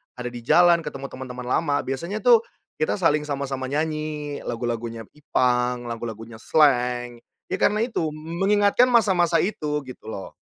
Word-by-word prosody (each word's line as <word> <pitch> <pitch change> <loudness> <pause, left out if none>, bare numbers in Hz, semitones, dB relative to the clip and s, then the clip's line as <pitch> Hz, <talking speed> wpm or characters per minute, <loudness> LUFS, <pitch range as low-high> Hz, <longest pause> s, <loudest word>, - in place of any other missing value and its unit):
ada 125 -1 -5
di 120 - -7
jalan, 170 +7 +5
ketemu 135 -4 -7
teman-teman 125 -1 -7
lama, 145 +2 +1
biasanya 170 +11 -4
tuh 240 -2 +7 0.4
kita 155 - +1
saling 150 -5 +1
sama-sama 135 -2 -3
nyanyi 150 0 -3
lagu-lagunya 115 -1 -3
Ipang, 125 -4 0
lagu-lagunya 115 -1 -7
Slank. 125 -4 +2 0.3
Ya - - -1
karena 215 +2 +2
itu, 230 -9 -1
m 160 +3 -7
mengingatkan 205 +4 +4
masa-masa 190 -8 +3
itu, 150 -7 -2
gitu 130 -4 -12
loh. 95 - -7
145 Hz, 145 wpm, -24 LUFS, 125-170 Hz, 0.4 s, tuh